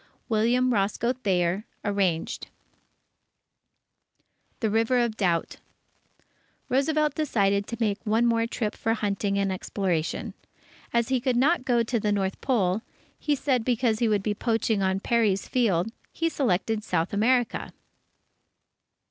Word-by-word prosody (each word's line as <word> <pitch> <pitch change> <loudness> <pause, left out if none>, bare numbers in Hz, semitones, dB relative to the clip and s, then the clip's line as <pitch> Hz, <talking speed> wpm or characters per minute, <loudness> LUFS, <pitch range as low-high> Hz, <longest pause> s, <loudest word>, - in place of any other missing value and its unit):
William 240 +3 +2
Roscoe 210 +4 +1
Thayer 190 -5 0 0.2
(Arranged) 195 -5 -1 2.1
THE 220 -3 0
RIVER 225 +3 +2
OF 235 -3 +1
DOUBT 175 -6 0 1.1
Roosevelt 300 +3 +2
decided 200 -10 +1
to 235 - -5
make 210 -3 -1
one 225 +1 +2
more 230 -1 +2
trip 225 -2 -2
for 225 0 -1
hunting 200 -1 -1
and 195 -1 +1
exploration. 185 -3 -2 0.6
As 235 0 +1
he 260 -2 +1
could 255 -1 +1
not 275 +2 +2
go 240 -2 +3
to 235 +1 -1
the 210 0 0
North 195 -2 -1
Pole, 210 -6 +1 0.4
he 295 - +1
said, 260 -4 0
because 235 -2 +1
that 235 - +2
would 205 -2 +1
be 210 - 0
poaching 225 -1 0
on 190 0 0
Peary's 215 -5 +1
field, 220 -6 +1 0.2
he 330 0 -1
selected 220 - 0
South 170 -4 -1
America. 240 +3 +1
220 Hz, 130 wpm, -26 LUFS, 200-245 Hz, 2.1 s, go